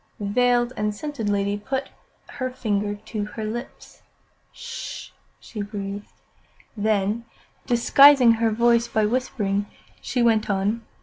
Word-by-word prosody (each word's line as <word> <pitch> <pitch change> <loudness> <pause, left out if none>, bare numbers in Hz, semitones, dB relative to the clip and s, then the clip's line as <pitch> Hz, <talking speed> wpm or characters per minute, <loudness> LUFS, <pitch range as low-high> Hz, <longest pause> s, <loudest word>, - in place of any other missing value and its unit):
The 205 - -4
veiled 245 +3 +2
and 210 0 -1
scented 270 -4 -4
lady 200 0 0
put 265 +5 -3 0.4
her 255 -1 -4
finger 210 -5 -2
to 205 0 -5
her 215 +1 -7
lips. 235 +3 -7 0.5
"'Sh!" 485 -1 -8 0.3
she 215 - -7
breathed. 205 0 -6 0.6
Then, 210 +1 0 0.4
disguising 255 +1 +6
her 230 0 +2
voice 235 +1 +3
by 215 -1 +1
whispering, 210 -4 -1 0.3
she 245 -2 -1
went 220 -2 +2
on. 205 +3 0
220 Hz, 125 wpm, -23 LUFS, 205-240 Hz, 0.6 s, disguising